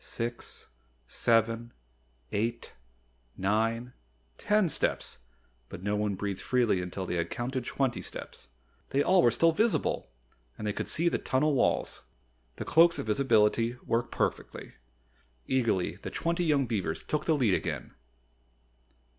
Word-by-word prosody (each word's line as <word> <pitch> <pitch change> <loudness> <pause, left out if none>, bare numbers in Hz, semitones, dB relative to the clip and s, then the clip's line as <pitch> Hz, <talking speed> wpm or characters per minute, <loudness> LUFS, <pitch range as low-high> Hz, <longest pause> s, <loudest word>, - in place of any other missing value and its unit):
Six 120 0 -5 0.4
seven 115 - +1 0.6
eight 115 +3 -2 0.6
nine 115 +5 0 0.5
ten 210 -2 +3
steps 150 - -2 0.5
but 90 - -9
no 100 +1 0
one 105 -1 0
breathed 100 -1 -4
freely 120 -7 +2
until 90 +1 -5
they 90 - -2
had 85 0 -1
counted 125 +1 -3
twenty 130 -2 -1
steps. - - -9 0.4
They 140 +1 +2
all 185 +2 +5
were 120 - +5
still 165 +8 +3
visible! 215 +7 0 0.5
And 105 - -6
they 105 - 0
could - - -4
still 165 - -1
see - - +5
the - - -1
tunnel 150 +3 +1
walls. 135 - +1 0.5
The - - -6
Cloaks 170 +1 +5
of - - -3
Visibility 115 0 +2
worked 120 +1 0
perfectly. - - -3 0.7
Eagerly 115 -8 0
the - - -7
twenty 170 +1 -1
young 145 -4 +3
beavers 110 -5 -2
took 150 0 -2
the 160 - +3
lead 120 -9 +2
again. - - -3
120 Hz, 140 wpm, -29 LUFS, 105-140 Hz, 0.7 s, all